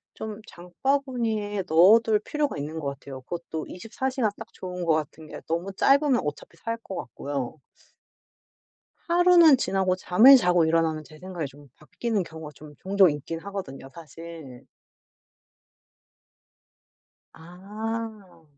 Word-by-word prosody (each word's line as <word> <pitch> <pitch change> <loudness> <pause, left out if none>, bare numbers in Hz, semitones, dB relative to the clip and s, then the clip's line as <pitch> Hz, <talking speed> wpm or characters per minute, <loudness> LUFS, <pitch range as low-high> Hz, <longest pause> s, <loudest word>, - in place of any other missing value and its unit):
좀 220 0 -7
장바구니에 220 +1 -2
넣어둘 210 +7 +5
필요가 295 - -2
있는 150 +3 -5
것 145 - -4
같아요. 135 -1 -10
그것도 160 +2 -6
24 225 +7 -4
시가 255 -5 0
딱 225 - -9
좋은 180 -1 -6
거 165 - +3
같은 155 0 -4
게 - - -9
너무 170 +4 -2
짧으면 275 +4 +3
어차피 150 +3 -6
살 230 +7 -4
것 210 -4 -9
같고요. 135 +2 -5 1.5
하루는 345 -3 +6
지나고 190 -6 0
잠을 220 +9 +7
자고 180 -7 +3
일어나면 160 -1 +1
제 155 +1 -15
생각이 180 -3 -5
좀 140 +1 -15
바뀌는 215 +6 -3
경우가 160 -3 -9
좀 150 -1 -13
종종 195 -2 +4
있긴 150 +3 -5
하거든요 180 -9 -7
사실. 165 -4 -11 2.7
아. 200 +1 -7
180 Hz, 260 characters per minute, -25 LUFS, 160-225 Hz, 2.7 s, 잠을